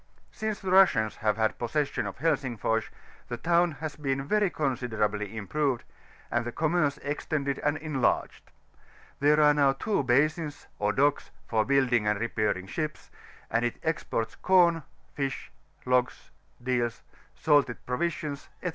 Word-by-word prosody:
Since 215 -2 -4
the 190 - -3
Russians 160 - +4
have 105 -2 0
had 110 -1 0
possession 140 +5 -1
of - - -7
Helsingfors, 130 -8 0 0.4
the 120 - -4
town 170 +5 +2
has 155 +1 -6
been 135 -2 -2
very 210 +4 +2
considerably 110 - -2
improved, 130 +4 -1 0.5
and 120 - +1
the 120 - -4
commerce 155 0 +1
extended 145 -1 -2
and 145 +1 0
enlarged: 150 -5 -1 0.7
there 150 +2 +4
are 150 -1 +6
now 140 -2 +3
two 200 +8 0
basins, 145 +4 +1
or 105 0 +2
docks, 145 +4 +1 0.2
for 110 -1 +2
biiilding 130 -5 +3
and 105 -1 0
repairing 110 -5 -1
ships; 155 +10 -5 0.4
and 115 +1 +2
it 120 - -1
exports 135 -8 -2
com, 175 -3 +4 0.3
fish, 135 -2 -4 0.3
logs, 125 0 0 0.3
deals, 120 -2 -1 0.3
salted 145 -6 +2
provisions, 145 +1 -3
&c. 180 - 0
140 Hz, 140 wpm, -28 LUFS, 120-155 Hz, 0.7 s, are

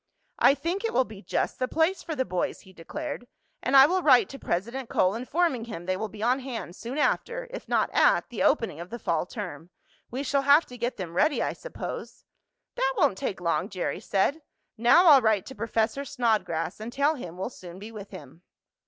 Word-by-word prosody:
"I 275 - +6
think 340 - -3
it 455 - -2
will 260 - +5
be 215 -5 -11
just 180 - -2
the 255 - 0
place 325 +7 +1
for 320 - -5
the 260 -2 0
boys," 180 -5 -2
he 190 - -17
declared, 245 - -6 0.3
"and 270 +2 +3
I 270 - +10
will 365 +5 +1
write 265 -7 +5
to 275 - -9
President 235 +8 -3
Cole, 185 +1 +2
informing 255 +1 0
him 175 -7 -7
they 185 +1 0
will 220 +4 -3
be 210 +1 -8
on 250 +3 +2
hand 245 -9 -6
soon 235 +7 -6
after, - - 0
if - - -8
not - - +1
at, - - +4
the - - -5
opening 225 - +2
of 175 +1 -7
the 235 - -5
fall 175 -5 -1
term. 180 -5 -7 0.4
We 260 +4 -4
shall 280 0 +1
have 285 +4 +5
to 250 - -11
get 240 +2 -2
them 175 -3 -6
ready, 295 - +2
I - - -1
suppose." - - -7 0.5
"That 265 0 0
won't - - +3
take 190 - -3
long," 170 +2 0
Jerry 185 -3 -3
said. 215 +10 0 0.3
"Now 240 +11 +5
I'll 290 -5 +8
write 220 -4 +2
to 265 - -8
Professor 230 +3 -1
Snodgrass, 215 - -1
and 220 +2 -6
tell 280 +4 +2
him 180 - -8
we'll 190 +6 -4
soon 180 -5 -11
be 210 +4 -9
with 210 -2 -9
him." 160 -3 -12
235 Hz, 215 wpm, -27 LUFS, 190-280 Hz, 0.5 s, I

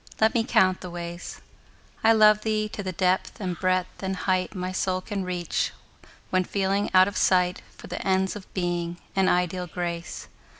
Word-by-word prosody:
Let 220 0 +4
me 235 - +2
count 185 -5 +3
the 180 - -6
ways. 175 0 -7 0.6
I 225 - +6
love 215 -1 +6
thee 215 -1 0
to 210 - -5
the 190 -2 -3
depth 185 +1 0
and 185 -4 -2
breadth 185 0 0
and 190 0 -2
height 185 0 0
My 185 0 -3
soul 185 0 0
can 195 +1 -4
reach, 180 -1 -2 0.6
when 185 0 +3
feeling 195 +2 0
out 185 0 +6
of 200 - -5
sight 180 -1 +2 0.2
For - - -11
the - - -5
ends 190 0 +1
of 200 -2 -10
Being 175 -2 -1 0.2
and 190 -1 +3
ideal 180 0 0
Grace. 170 0 -5
185 Hz, 180 wpm, -26 LUFS, 180-195 Hz, 0.6 s, I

